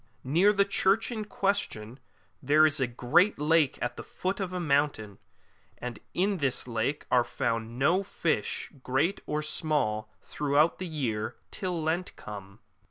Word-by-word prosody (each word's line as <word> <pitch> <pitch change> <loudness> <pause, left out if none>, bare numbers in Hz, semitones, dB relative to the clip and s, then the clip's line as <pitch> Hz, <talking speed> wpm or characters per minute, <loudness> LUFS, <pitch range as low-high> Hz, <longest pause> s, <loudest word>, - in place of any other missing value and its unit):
Near 170 +10 +4
the 200 -1 +3
church 200 +3 +2
in 215 -3 -3
question 170 - -2 0.4
there 150 +3 +5
is 155 -1 +1
a 130 - +2
great 150 - +3
lake 150 -1 +3
at 120 0 -3
the - - -6
foot 190 +3 -3
of 190 -2 -2
a 180 - -3
mountain, 140 - 0 0.6
and 120 -2 -6 0.2
in 195 +2 +1
this 135 -5 -1
lake 120 +5 -1
are 125 -1 +5
found 115 -1 -2
no 160 +8 +3
fish, 195 - -2
great 140 +10 0
or 150 0 -1
small, 140 -9 -1
throughout 150 +3 +1
the 185 - -3
year 115 -9 -2 0.2
till 180 -4 -3
Lent 170 +3 -1
come. 100 -1 -9
150 Hz, 155 wpm, -29 LUFS, 120-180 Hz, 0.6 s, there